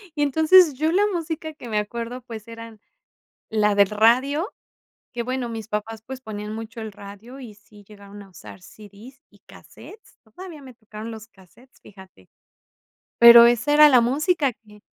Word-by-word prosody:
Y 295 - -3
entonces, 315 +3 +4
yo 310 +4 -1
la 385 +4 +2
música 320 -2 -5
que 245 -5 -12
me 215 - -2
acuerdo, 235 +4 -6
pues, 225 -3 -11
eran 230 -1 -12 0.7
la 210 -1 0
del 200 -1 +3
radio, 255 - +1 0.6
que 240 -1 -4
bueno, 255 0 -4
mis 225 -2 -8
papás, 220 +1 -6
pues, 265 0 -9
ponían 210 -2 -8
mucho 225 +1 -9
el 220 - -7
radio 205 +6 -13
y 240 -5 -11
sí 210 0 -20
llegaron 205 -1 -14
a 195 - -19
usar 105 - -14
CDs 215 - -16
y - - -25
casetes, 435 +1 -17
todavía 310 - -13
me 260 -2 -14
tocaron 220 -1 -11
los 220 0 -11
casetes, 230 +5 -24
fíjate, 190 - -18 0.9
pero 235 0 +9
esa 240 +5 0
era 300 0 +7
la 255 -4 +5
música 285 +4 0
que 210 -2 -21
230 Hz, 170 wpm, -22 LUFS, 210-270 Hz, 0.9 s, pero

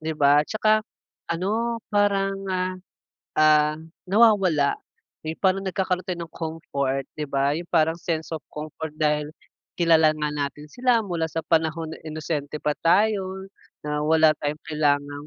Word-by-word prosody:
'di 160 0 -3
ba? 145 0 +5
'Tsaka 215 0 +2 0.5
,ano 220 +7 -1
parang, 200 -1 +2 0.2
ah, 185 0 -1 0.6
ah, 155 0 +5 0.3
nawawala 195 -9 +4 0.5
yung 160 +1 -4
parang 190 0 +2
nagkakaroon 185 -1 -1
tayo 175 -3 -4
ng 165 - -30
comfort, 140 -5 -3
'di 155 - -3
ba? 140 0 +1
Yung 170 +1 -6
parang 160 -1 +2
sense 165 -1 -3
of 160 - -4
comfort 155 +1 -6
dahil 150 -1 +1 0.5
kilala 160 -2 +5
nga 150 0 -1
natin 145 0 -4
sila 245 -2 +2
mula 170 -4 -2
sa 165 - -3
panahon 160 0 0
na - - -8
inosente 155 -1 -4
pa 150 - +1
tayo 190 +1 +2 0.4
na 150 0 -2
wala 160 0 +5
tayong 150 +1 -3
kailangang 145 -2 0
160 Hz, 145 wpm, -24 LUFS, 150-185 Hz, 0.6 s, ba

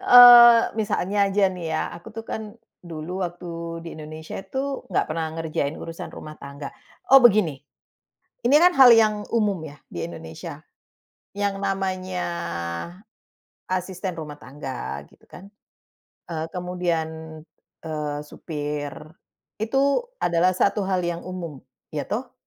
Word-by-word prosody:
eee, 240 -1 +11 0.2
misalnya 205 -1 +1
aja 200 +1 +1
nih 180 -2 -6
ya - - 0
aku 170 - -12
tuh 225 - -5
kan, 215 0 -6 0.2
dulu 170 +2 -6
waktu 175 +1 -8 0.4
di 170 - -7
Indonesia 155 +1 -8
itu 265 +8 -4
nggak - - +1
pernah 160 0 -2
ngerjain 155 -3 -2
urusan 165 0 -7
rumah 155 0 -9
tangga 140 0 -8 0.4
oh 270 - +11
begini. 210 - +4 0.9
Ini 250 - +4
kan 360 0 +5
hal 255 -3 +10
yang 215 -2 +3
umum 210 -4 +2
ya 145 -1 -10
di 85 - -4
Indonesia, 80 -1 -8 0.8
yang 200 -1 -1
namanya, 185 -2 -2 1.5
asisten 185 0 -2
rumah 150 -2 -7
tangga 130 - -6
gitu - - -24
kan, 190 +2 -13 0.8
eee, 160 -2 -4
kemudian, 180 -2 -2 0.8
eee, 150 -2 -3
supir, 150 -2 -5 0.7
itu 275 - +2 0.2
adalah 170 +2 +3
1 200 +2 +2
hal 190 -1 0
yang 170 0 -3
umum 170 -6 -7 0.3
iya 145 - -1
toh? 245 +3 -3
180 Hz, 130 wpm, -24 LUFS, 155-210 Hz, 1.5 s, eee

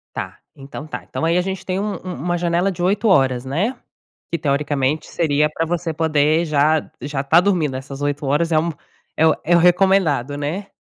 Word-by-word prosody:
Tá. - - -5 0.2
Então 140 +2 -9
tá. - - -7
Então - - -3
aí 170 +2 +2
a - - +3
gente 190 0 -4
tem 185 0 -2
um 205 0 -2
um 185 - -5
uma 175 +6 -2
janela 175 +2 +1
de 175 -1 -6
8h, 200 +4 +1 0.4
né? 190 - -1 0.6
Que 170 - 0
teoricamente 145 0 0
seria 150 -2 +1
pra 165 +2 -2
você 170 -1 -2
poder 155 +1 +2
já 155 0 +1
já 140 0 -3
tá 160 +5 +5
dormindo. 170 -9 0
Essas 135 +1 -7
8 145 0 -2
horas 150 +5 +1
é 155 - +4
um 170 +2 0 0.5
é 160 - +4
o 160 - +5
é 175 - +3
o - - +5
recomendado, 175 -7 +3
né? 155 +8 -3
160 Hz, 200 wpm, -20 LUFS, 145-175 Hz, 0.6 s, tá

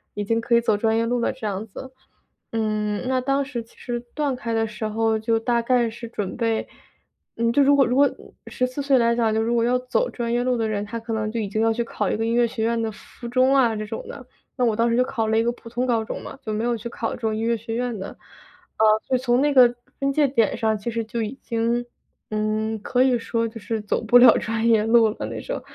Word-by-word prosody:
已 205 - -2
经 230 +2 +1
可 235 0 +2
以 235 - +5
走 225 -2 +2
专 220 +1 +1
业 230 - +1
路 245 +1 0
了 235 - 0
这 255 -5 -5
样 200 +1 -3
子。 260 +5 -9 0.6
嗯， 215 -2 -1
那 260 0 +1
当 275 +2 +1
时 245 -4 -5
其 230 - -24
实 240 -1 -4
断 290 -3 -1
开 235 -2 -4
的 225 0 +1
时 215 +1 -6
候 220 +1 +1
就 225 +1 +1
大 235 +1 +1
概 240 -1 +2
是 235 +1 -8
准 205 -4 -4
备 230 -2 0 0.7
嗯， 230 0 +1
就 285 - +4
如 285 +1 +5
果 275 -1 +5
如 245 - 0
果 285 0 +5 0.4
14 255 +2 -2
岁 275 -1 +3
来 235 -1 +3
讲， 225 -2 +1
就 220 - +1
如 230 +2 0
果 230 - +2
要 245 +2 +2
走 255 - -1
专 235 -1 -3
业 240 - +1
路 250 0 +1
的 225 -1 -1
人， 205 -1 -2
他 210 +3 -5
可 225 0 -7
能 215 -1 -1
就 230 - -3
已 210 -3 -3
经 215 +2 -1
要 225 0 +3
去 235 +1 -1
考 210 -3 -2
一 - - 0
个 225 - -1
音 230 - 0
乐 240 0 +4
学 225 -1 -4
院 230 0 +1
的 225 - -1
附 235 +3 -11
中 255 +2 +3
啊 240 -5 +3
这 215 0 -4
种 220 +1 -7
的， 270 -3 -9 0.3
那 250 - +1
我 230 - +2
当 230 +2 +2
时 230 - +1
就 250 - +4
考 225 -3 -2
了 220 0 +2
一 225 - +3
个 235 - +1
普 230 - -13
通 240 +2 -1
高 235 -3 +1
中 - - -5
嘛， - - -9
就 215 - -3
没 215 +1 -2
有 240 0 0
去 225 - -7
考 230 -1 -3
这 - - -8
种 220 -1 0
音 220 - -3
乐 230 0 +1
学 225 +1 -5
院 245 -1 -2
的。 195 0 -7 0.6
啊 - - +2 0.3
就 260 - +3
从 245 -1 +1
那 290 0 +2
个 250 -3 +7 0.3
分 275 0 +1
界 295 0 +3
点 230 -5 +1
上 220 -1 +1
其 210 +3 -4
实 230 0 -2
就 230 +1 -3
已 225 +5 -4
经， 235 +1 -1 0.4
呃， 215 +1 -1
可 250 0 +2
以 255 -2 +3
说 230 0 -1
就 225 0 -9
是 220 0 -3
走 210 - -1
不 230 +2 +6
了 245 0 +8
专 225 +1 -2
业 220 -2 +4
路 225 0 +5
了 215 - -5
那 - - -6
种， - - -5
230 Hz, 290 characters per minute, -23 LUFS, 220-245 Hz, 0.7 s, 了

